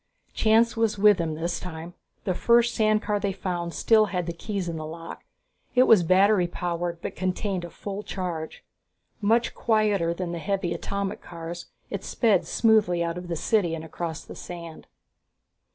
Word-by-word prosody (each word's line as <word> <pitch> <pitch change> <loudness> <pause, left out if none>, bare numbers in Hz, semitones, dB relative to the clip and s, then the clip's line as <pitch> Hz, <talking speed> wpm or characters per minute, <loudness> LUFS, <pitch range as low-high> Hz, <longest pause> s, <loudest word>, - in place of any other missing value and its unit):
Chance 225 +1 +3
was 225 -2 +1
with 205 0 +6
them 160 -2 -1
this 170 +2 -2
time. 170 -1 -7 0.3
The 185 - 0
first 235 +5 +3
sand 215 0 +2
car 210 -1 0
they 200 -1 -1
found 180 -3 -3
still 215 -2 +4
had 180 -3 -2
the 170 - -3
keys 195 +1 -4
in 170 - -3
the 155 - -5
lock. 165 +1 -8 0.5
It 250 - +7
was 225 -7 +6
battery 185 +2 +4
powered, 175 -1 -3
but - - -4
contained 185 0 -2
a 175 - -6
full 200 +3 -6
charge. 175 -6 -5 0.6
Much 230 +3 +2
quieter 210 -6 +1
than 170 0 -3
the 170 - -4
heavy 190 -1 -1
atomic 200 +2 -3
cars, 170 0 -8 0.2
it - - -4
sped 215 -7 +2
smoothly 210 -7 +3
out 170 +1 -2
of 180 - -9
the 170 - -2
city 175 -1 +1
and 160 0 -7
across 160 0 -5
the - - -10
sand. 170 -2 -9
180 Hz, 175 wpm, -26 LUFS, 170-210 Hz, 0.6 s, It